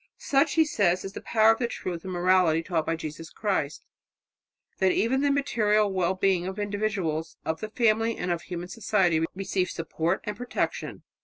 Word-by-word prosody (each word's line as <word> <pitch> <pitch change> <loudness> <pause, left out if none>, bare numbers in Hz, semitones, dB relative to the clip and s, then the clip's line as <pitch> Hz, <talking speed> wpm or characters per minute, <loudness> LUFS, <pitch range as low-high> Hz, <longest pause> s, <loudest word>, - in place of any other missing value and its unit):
"Such," 280 +2 +2
he 320 -1 +5
says, 185 - +1
"is 195 - -6
the - - -7
power 220 -1 +4
of 225 - 0
the 240 - 0
truth 175 -7 -5
and 190 - -5
morality 175 -2 +3
taught 165 -3 -1
by 165 - +1
Jesus 160 0 -7
Christ, 175 -9 -2 0.9
that 190 -1 +4
even 255 +8 +1
the 285 - +2
material 215 -7 +2
well 185 0 +1
being 185 -2 +1
of 190 +1 -5
individuals, 200 -7 -2
of 160 0 -2
the 215 - -5
family 225 0 +2
and 180 - -2
of 170 -1 -1
human 175 +1 -6
society 185 -6 +1
receive 190 -1 -1
support 165 +2 -2
and 210 - -4
protection." 245 0 -3
190 Hz, 180 wpm, -27 LUFS, 170-215 Hz, 0.9 s, he